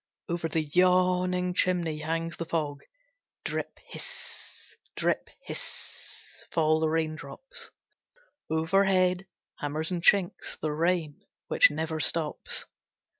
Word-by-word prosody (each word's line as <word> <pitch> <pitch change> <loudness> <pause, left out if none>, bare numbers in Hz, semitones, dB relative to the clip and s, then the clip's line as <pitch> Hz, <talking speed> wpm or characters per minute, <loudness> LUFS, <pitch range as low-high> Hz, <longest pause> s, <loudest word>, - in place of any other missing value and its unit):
Over 170 -1 -1
the 160 0 +1
yawning 180 +2 +3
chimney 175 -4 +2
hangs 165 +1 -2
the 170 - -3
fog. 150 -4 -2 0.6
Drip - - -3
hiss - - -9 0.2
drip - - 0 0.2
hiss - - -8
fall 155 -1 +3
the 160 0 +2
raindrops. 165 - -4 0.8
Overhead 185 +3 +3 0.3
hammers 155 +3 -2
and 175 -2 -1
chinks 185 0 +3
the 155 - -1
rain 165 -1 0 0.3
which - - +7
never 160 +1 -2
stops. 155 0 +1
165 Hz, 105 wpm, -29 LUFS, 155-180 Hz, 0.8 s, which